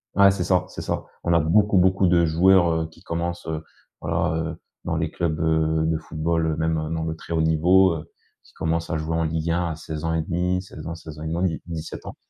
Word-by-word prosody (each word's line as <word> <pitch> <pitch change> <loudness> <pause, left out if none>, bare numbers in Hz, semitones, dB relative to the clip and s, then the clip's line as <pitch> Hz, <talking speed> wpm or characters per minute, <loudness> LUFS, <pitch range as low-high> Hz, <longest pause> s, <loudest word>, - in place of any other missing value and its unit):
Ouais 100 +1 +7
c'est 95 -2 0
ça, 90 +1 +2
c'est - - -7
ça. - - -3 0.2
On 85 - +2
a 85 - +5
beaucoup, 100 +6 +3
beaucoup 95 +1 +3
de 85 -1 +4
joueurs, 85 +2 +5
heu, 80 0 0
qui 80 - -19
commencent, 85 +1 -4
heu, 80 -1 -3 0.4
voilà, 80 0 0 0.2
heu, - - -8 0.3
dans - - -1
les - - -1
clubs, 80 -3 -2
heu, 80 0 +2
de 80 0 +1
football, 80 +1 -1
heu, 80 -1 0
même 80 0 +1 0.2
dans 80 0 -2
le 80 0 -3
très 80 - -7
haut 80 - +2
niveau, 85 +4 +4
heu, 75 - -8 0.3
qui - - -22
commencent 85 +1 -2
à 80 - 0
jouer 80 +1 -2
en 80 - +1
ligue 80 0 -1
1 85 +1 +1
à - - -4
16,5 80 +3 -1
16 80 -5 -11
ans, 85 - -4
16,5, 80 +2 -3
17 80 -2 -6
ans. - - -7
80 Hz, 220 wpm, -24 LUFS, 80-85 Hz, 0.4 s, Ouais